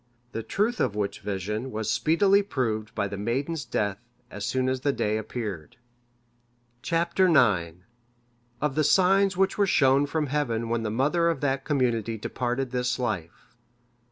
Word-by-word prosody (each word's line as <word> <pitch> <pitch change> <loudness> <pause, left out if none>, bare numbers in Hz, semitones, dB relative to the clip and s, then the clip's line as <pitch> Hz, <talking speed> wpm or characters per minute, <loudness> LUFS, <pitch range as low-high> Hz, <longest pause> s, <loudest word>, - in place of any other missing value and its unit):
The 115 - -4
truth 215 - -1
of 105 - 0
which 100 -1 -2
vision 105 +5 -3
was 110 -2 -2
speedily 195 - +3
proved 115 - -3
by 100 - 0
the 100 0 -6
maiden's 140 +9 -2
death 100 -1 -2 0.3
as 105 - -6
soon 130 0 0
as 130 0 -1
the 140 - +2
day 105 -5 -1
appeared. 110 -6 -5 1.0
Chap. 170 +1 -1
IX. 105 - +4 0.9
Of 150 -2 0
the 155 +2 +1
signs 195 +4 +3
which 195 +2 +1
were 200 - +4
shown 140 -3 +4
from 155 +1 -1
Heaven 120 -6 -1
when 115 0 0
the 110 - -2
mother 150 +9 +2
of 165 -5 -2
that 135 -1 -1
community 115 -6 0
departed 125 +4 -3
this 125 -1 -1
life. 105 -10 -4
125 Hz, 155 wpm, -26 LUFS, 110-155 Hz, 1.0 s, IX